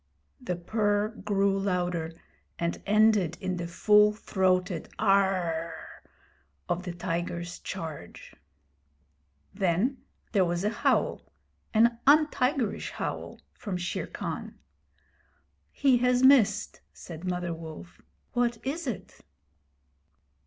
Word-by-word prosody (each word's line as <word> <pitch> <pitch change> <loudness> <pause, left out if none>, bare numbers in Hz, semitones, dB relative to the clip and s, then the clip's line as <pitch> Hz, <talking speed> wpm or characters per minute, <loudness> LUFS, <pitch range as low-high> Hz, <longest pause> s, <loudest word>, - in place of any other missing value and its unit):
The 180 - -2
purr 205 +3 0
grew 200 -3 0
louder, 180 -4 -1 0.4
and 170 0 -2
ended 210 -5 +3
in 185 -1 -2
the 170 -1 -4
full 210 +4 +5
throated 185 -4 0
'Aaarh!' 185 -5 0 0.7
of 175 - -1
the 185 -1 -5
tiger's 175 0 -4
charge. 160 - -7 1.2
Then 195 +7 +1 0.3
there 200 -4 +3
was 175 +1 -1
a 210 - +1
howl - - 0 0.4
an 230 +1 +3
untigerish 280 -5 +3
howl - - -5
from 195 -5 -5
Shere 180 0 -3
Khan. - - -6 1.1
He 270 -3 +3
has 250 +1 +2
missed,' 260 -5 +4
said 165 -1 -10
Mother 180 -2 -2
Wolf. 165 +2 -10 0.3
'What 240 -1 +1
is 300 +3 -3
it?' 230 -7 -6
195 Hz, 105 wpm, -28 LUFS, 175-220 Hz, 1.2 s, full